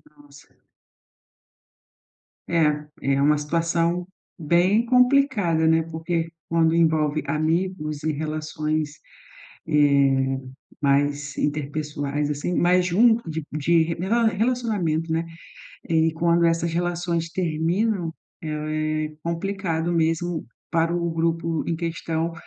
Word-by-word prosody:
Nossa. 145 0 -18 2.0
É, 150 -3 +1 0.3
é 135 - +1
uma 150 +1 +4
situação 165 +3 0 0.3
bem 180 +7 +2
complicada, 250 - +3
né. 160 0 +4
Porque 165 +1 -3 0.2
quando 165 -1 +2
envolve 155 -2 +2
amigos 155 -1 -1
e 155 - +1
relações, 155 0 -3 0.7
eh, 140 -3 +3 0.4
mais 145 +1 +1
interpessoais, 145 0 -2
assim, 150 +4 -2
mais 180 +1 +3
junto 225 +2 +3
de 160 0 -4
de 160 +2 +3
re 165 +1 -2
rela 225 +7 +1
relacionamento, 210 -8 0
né, 165 +1 0 0.6
e 160 0 +2
quando 170 +1 +2
essas 165 0 +1
relações 170 -1 -1
terminam, 175 +2 0 0.3
é 155 -1 -3 0.5
é - - -6
complicado 170 -1 -2
mesmo 165 0 0 0.2
para 165 +1 +1
o 170 -1 -1
grupo 165 0 -1
em 165 - 0
questão 165 0 -2
165 Hz, 105 wpm, -24 LUFS, 155-175 Hz, 2.0 s, uma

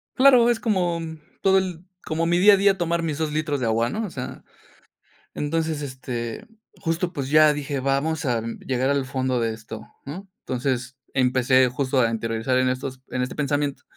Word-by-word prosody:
Claro, 255 -3 +6
es 235 - +1
como 180 -7 0 0.4
todo, 190 0 +4
el 180 -2 -2 0.2
como 160 +1 -1
mi 175 +1 +2
día 205 +3 +8
a - - +5
día 195 0 +3
tomar 170 -1 0
mis 155 -3 -2
2 155 -1 -1
litros 150 -1 -1
de 125 - -1
agua, 115 +1 +1
¿no? 220 - -2
O - - -5
sea, 130 -6 -7 0.9
entonces, 160 0 -1
este, 130 - -5 0.3
justo 170 +2 -1
pues 135 -4 -4
ya 155 0 +6
dije, 145 -1 -3
vamos 140 +4 0
a 120 -3 +1 0.2
llegar 130 0 -1
al 140 -1 +1
fondo 130 -1 -1
de 115 -1 0
esto, 110 0 -9 0.2
mm, 150 +7 -6 0.2
entonces, 130 0 -2 0.2
empecé 130 0 +3
justo 130 +1 0
a 115 -1 +2
interiorizar 115 +3 -1
en 130 0 +2
estos 130 0 -4
en 125 - -2
este 125 - -4
pensamiento. 145 -1 -1
140 Hz, 185 wpm, -24 LUFS, 130-165 Hz, 0.9 s, día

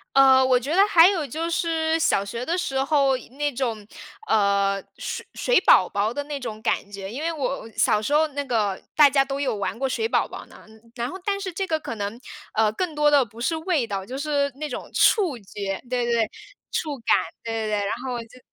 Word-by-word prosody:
呃， 265 -1 +7
我 255 -1 +4
觉 285 +7 -3
得 390 - +6
还 335 -2 +7
有 345 -7 -1
就 325 +6 -3
是 325 -1 0
小 200 -10 +2
学 230 +5 -5
的 345 +2 -1
时 270 -7 -1
候 275 -2 +3
那 285 +3 -4
种， 230 -5 -3 0.4
呃， 200 -1 +2 0.2
水 - - -5
水 - - +3
宝 185 - +6
宝 205 +2 -1
的 285 - -3
那 290 -1 -5
种 220 -4 -6
感 220 -3 -1
觉， 195 0 -7
因 265 +6 -5
为 335 +1 -1
我 275 -6 -3
小 210 - +3
时 285 +7 -2
候 315 +1 +4
那 285 0 -3
个 215 -7 -1
大 295 -2 +8
家 275 0 +3
都 275 0 -4
有 260 -6 -1
玩 200 +2 -3
过 270 +1 -1
水 445 - -1
宝 - - +1
宝 - - -9
呢， - - -16 0.3
然 235 +1 -2
后 375 - -7
但 400 -1 -1
是 385 -2 -4
这 385 +2 -3
个 315 -1 0
可 230 - -6
能， 205 +3 -5 0.3
呃， 215 -1 +2
更 320 +6 -3
多 295 0 +3
的 285 -2 +5
不 230 0 -14
是 325 +7 0
味 320 -7 0
道， 195 -3 -4
就 260 +5 -6
是 285 -1 0
那 300 +1 -4
种 - - -6
触 360 - +3
觉， 195 -1 -5
对 250 -1 0
对 240 - -1
对， 225 -1 +1 0.4
触 295 -3 -2
感， 230 - +3 0.3
对 230 - -4
对 225 -1 -2
对， 210 -1 0
然 - - -2
后 245 -2 -3
就 245 +3 -17
265 Hz, 245 characters per minute, -24 LUFS, 220-310 Hz, 0.4 s, 大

